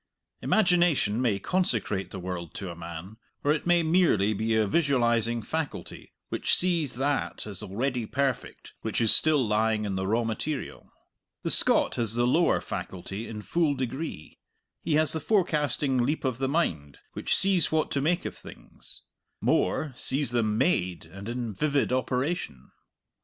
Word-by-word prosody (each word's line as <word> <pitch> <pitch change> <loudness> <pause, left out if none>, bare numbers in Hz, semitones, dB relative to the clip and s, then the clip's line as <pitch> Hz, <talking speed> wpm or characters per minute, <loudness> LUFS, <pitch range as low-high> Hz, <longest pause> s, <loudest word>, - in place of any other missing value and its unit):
Imagination 175 - +3
may 115 -6 +2
consecrate 110 - 0
the 100 - -7
world 90 -3 -6
to 95 -3 -5
a - - -9
man, 85 +5 -8 0.3
or 145 - +3
it 155 - -4
may 175 -1 +4
merely 160 - +3
be 110 +2 0
a 110 -1 +3
visualizing 120 -4 +1
faculty 160 +3 -5 0.2
which - - +2
sees 170 -8 +1
that 140 +2 -1
as 100 -4 -7
already 120 +3 -2
perfect 135 -1 -3
which 110 - -2
is 115 -2 +5
still 150 -5 +3
lying 110 0 +1
in 100 - -2
the 95 0 -2
raw 115 +4 +1
material. 130 +6 -4 0.5
The - - 0
Scot - - +3
has 115 -2 0
the 120 0 +2
lower 160 +8 +3
faculty 95 +4 -6
in 105 -2 -7
full 160 0 +1
degree; 130 - -5 0.4
he 155 - +1
has 155 -2 +4
the 160 - -1
forecasting 150 - +1
leap 140 +5 0
of 130 -2 -1
the 135 -1 0
mind 80 - -1 0.2
which - - 0
sees 190 -3 +2
what 155 0 +1
to 140 - 0
make 175 +5 0
of - - -4
things - - -12 0.4
more, 150 -4 +1
sees 135 0 +1
them 110 -3 +1
made 90 - 0
and 95 +3 -9
in 120 -2 -3
vivid 140 +3 0
operation. 130 - -2
125 Hz, 160 wpm, -27 LUFS, 105-155 Hz, 0.5 s, is